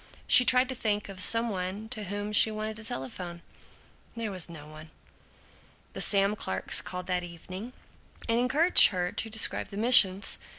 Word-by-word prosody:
She 250 0 +5
tried 255 +1 +4
to - - -4
think 210 -4 -3
of 195 -1 -10
some 230 +4 +1
one 190 +2 -6
to 215 -4 -8
whom 205 +2 -6
she 215 - +4
wanted 215 0 -6
to 220 - -6
telephone. 170 - -7 0.7
There 230 -2 -5
was 185 -3 -2
no 155 -3 -12
one. 155 +1 -14 1.0
The - - -5
Sam 200 0 +3
Clarks 95 - 0
called 180 0 -8
that 180 -1 -2
evening 185 +6 -10 0.6
and 230 0 0
encouraged 300 +8 +5
her 180 -3 -4
to 225 - -6
describe 220 0 +2
the 200 - -11
missions. 205 -4 +3
205 Hz, 170 wpm, -27 LUFS, 180-225 Hz, 1.0 s, She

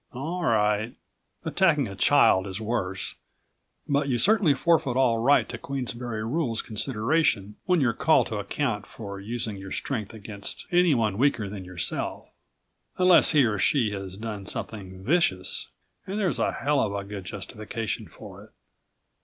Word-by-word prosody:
All 165 +8 -4
right... 110 -4 +1 0.5
attacking 155 -9 +2
a 100 - -8
child 100 -5 +4
is 95 +1 -5
worse 105 -4 -2 0.7
but 140 0 +1
you 125 - +1
certainly 190 - +4
forfeit 140 -4 +2
all 120 -4 +3
right 140 +5 +4
to - - -6
Queensberry 120 -4 -4
Rules 120 -3 -1
consideration 110 -2 0
when 180 -3 +3
you're 120 -4 +2
called 160 +7 +3
to 110 - -4
account 105 +1 -2
for 100 -3 -8
using 110 0 -4
your 95 0 -9
strength 110 -7 -3
against 105 -2 -6
anyone 130 - +3
weaker 130 -6 +2
than 95 -2 -7
yourself, 90 -2 -3 0.7
unless 180 -2 +6
he 145 -5 +5
or 105 -3 0
she 120 -4 +2
has 95 -2 -6
done 105 -3 -6
something 95 -4 -5
vicious 115 - +1 0.4
and 200 +3 -3
there's 185 -9 +1
a - - +1
hell 145 0 0
of 100 - -1
a 100 - -3
good 100 -2 -7
justification 105 +3 -5
for - - -12
it. - - -21
115 Hz, 155 wpm, -26 LUFS, 100-145 Hz, 0.7 s, unless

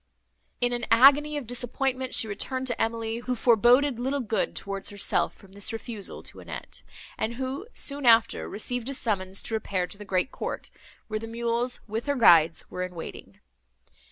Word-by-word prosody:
In 245 0 +2
an 240 -1 -2
agony 285 +6 +6
of 285 - -5
disappointment, 255 +2 -2
she 225 - +3
returned 255 +5 -3
to 245 -2 -2
Emily, 225 0 -1
who 250 +1 -3
foreboded 240 +3 +4
little 265 +3 -1
good 225 -3 -1
towards 195 0 -4
herself, 200 -1 0
from 195 - -18
this 200 +4 -3
refusal 225 -3 -6
to - - -12
Annette, - - -8 0.4
and 230 +2 -1
who, 265 - -4
soon 280 - +2
after, 230 -1 +4
received 245 +3 -2
a 275 - -2
summons 195 -5 -1
to - - -4
repair 200 -4 -1
to 200 - -7
the - - -7
great 195 +5 0
court, - - -5 0.4
where 215 -1 -3
the 225 - -7
mules, 235 +2 -1
with 225 +5 -4
her 285 - +1
guides, 165 - +5
were 180 - -6
in 180 -1 -4
waiting. 165 - -9
230 Hz, 180 wpm, -27 LUFS, 205-255 Hz, 0.4 s, agony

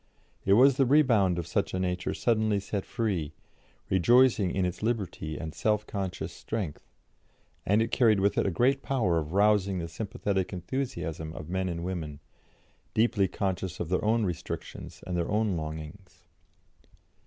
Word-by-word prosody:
It 95 - +5
was 130 +5 +6
the 135 - +4
rebound 115 - +4
of 85 - -2
such - - -1
a - - -1
nature 90 -1 -1
suddenly 110 -3 +1
set 100 0 -4
free, 95 - -2 0.5
rejoicing 110 +2 +4
in 95 +1 0
its 90 0 -4
liberty 100 -9 -2
and 80 -1 -6
self 105 -1 0
conscious 95 -4 -4
strength, 100 -10 -5 0.8
and 105 +3 +4
it 115 - -4
carried 110 -6 +4
with 100 +1 +2
it - - +1
a - - +3
great 130 +9 +2
power 110 -13 +1
of 75 +1 -5
rousing 100 -1 +3
the 85 -1 -3
sympathetic 95 +1 -2
enthusiasm 90 - -4
of 75 - -8
men 95 0 -1
and 85 -1 -4
women, 80 -6 -4 0.8
deeply 110 -3 +3
conscious 95 -2 -3
of 80 - -3
their 90 - 0
own 110 +1 +2
restrictions 90 -4 -6
and 90 - -3
their 85 -1 -1
own 105 -2 +1
longings. 80 +4 -7
95 Hz, 160 wpm, -28 LUFS, 85-110 Hz, 0.8 s, was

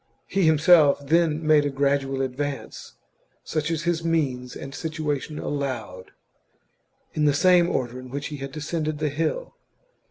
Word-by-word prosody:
He 195 -4 +1
himself 160 -1 +6
then 160 0 +2
made 155 -1 +5
a 145 - 0
gradual 135 -1 0
advance, 135 +1 -5 0.5
such 155 0 -2
as 165 -1 -2
his 170 -1 0
means 135 -7 -1
and 135 - -8
situation 155 -1 -3
allowed, 120 -12 -4 1.0
in 150 - +1
the 145 -1 +3
same 175 +2 +5
order 125 0 -2
in 130 0 -10
which 140 +2 -4
he 150 - -6
had 135 0 -6
descended 155 +1 -3
the 150 0 -1
hill. 165 - -2
150 Hz, 150 wpm, -24 LUFS, 135-160 Hz, 1.0 s, himself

